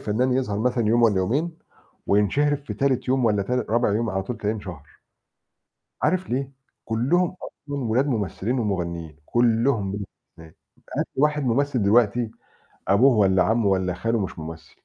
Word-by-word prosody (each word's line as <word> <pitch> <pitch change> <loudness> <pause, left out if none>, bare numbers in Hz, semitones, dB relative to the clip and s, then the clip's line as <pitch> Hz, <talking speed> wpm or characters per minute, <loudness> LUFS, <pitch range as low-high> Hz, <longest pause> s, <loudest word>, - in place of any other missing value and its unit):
فنان 125 +5 0
يظهر 125 -6 -1
مثلًا 120 -1 +1
يوم 120 +1 +3
والَّا 105 -4 +4
يومين، 145 - -1 0.5
وينشهر 140 +9 +2
في 140 - -8
تالت 130 -2 0
يوم 130 -1 +2
والَّا 105 -3 +2
ت 100 - -8
رابع 120 -3 +1
يوم 115 0 0
على 95 0 -1
طول 120 +4 -5
تلاقيه 105 +1 -1
انشهر. 85 -8 -10 1.1
عارف 185 -4 0
ليه؟ 135 +2 -2 0.3
كلّهم 145 +11 +1
أصلًا 145 -3 -6
ولاد 120 +5 +1
ممثلين 115 0 -2
ومغنيين، 85 -7 -3
كلّهم 115 -3 +1
بلا 100 0 -4
استثناء، 80 -3 -18 0.4
هات - - 0
لي 135 - +1
واحد 150 -1 +2
ممثل 130 0 +1
دلوقتي 110 +2 +3 0.6
أبوه 120 +8 +5
والَّا 95 -2 +4
عمه 110 +2 +1
والَّا 95 -2 +1
خاله 115 +6 -1
مش 95 -3 -4
ممثل. 80 0 -9
115 Hz, 160 wpm, -24 LUFS, 100-130 Hz, 1.1 s, أبوه